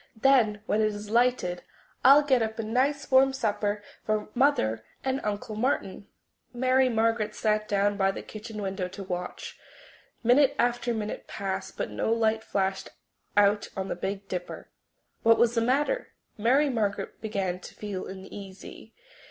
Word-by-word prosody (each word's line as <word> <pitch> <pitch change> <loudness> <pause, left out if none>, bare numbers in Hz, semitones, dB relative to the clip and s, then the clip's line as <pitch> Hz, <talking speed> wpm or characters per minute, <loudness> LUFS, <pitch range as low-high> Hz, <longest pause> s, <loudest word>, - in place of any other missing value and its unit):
"Then, 225 -5 +3
when 215 - +1
it 215 - +3
is 205 0 -5
lighted, 235 -7 +2 0.4
I'll 280 +3 +8
get 265 -4 +3
up 220 0 -2
a 225 - -2
nice 265 +7 0
warm 265 +1 +6
supper 210 -4 -1 0.2
for 215 -1 -1
Mother 115 - +2 0.2
and 265 0 0
Uncle 210 +1 -3
Martin." 215 -4 -1 0.5
Mary 255 +1 +3
Margaret 225 -2 +1
sat 215 -1 0
down 205 0 +1
by 195 -1 +3
the 195 - -4
kitchen 215 -1 -7
window 190 -1 -2
to 195 +2 -8
watch. 180 -1 -6 0.6
Minute 270 +4 +5
after 240 0 +1
minute 215 -2 -4
passed, 190 -1 -4
but - - -3
no - - -1
light 220 -1 +1
flashed 190 -2 -1 0.5
out 205 0 +4
on 190 0 -3
the - - -2
Big 195 +2 -4
Dipper. 180 -1 -6 0.5
What 230 0 +5
was 235 0 +3
the 230 - +1
matter? 290 - 0 0.2
Mary 255 +7 +3
Margaret 215 -6 -2
began 195 -4 -2
to - - -11
feel 205 -3 -5
uneasy. 195 +3 -10
215 Hz, 155 wpm, -27 LUFS, 200-245 Hz, 0.6 s, I'll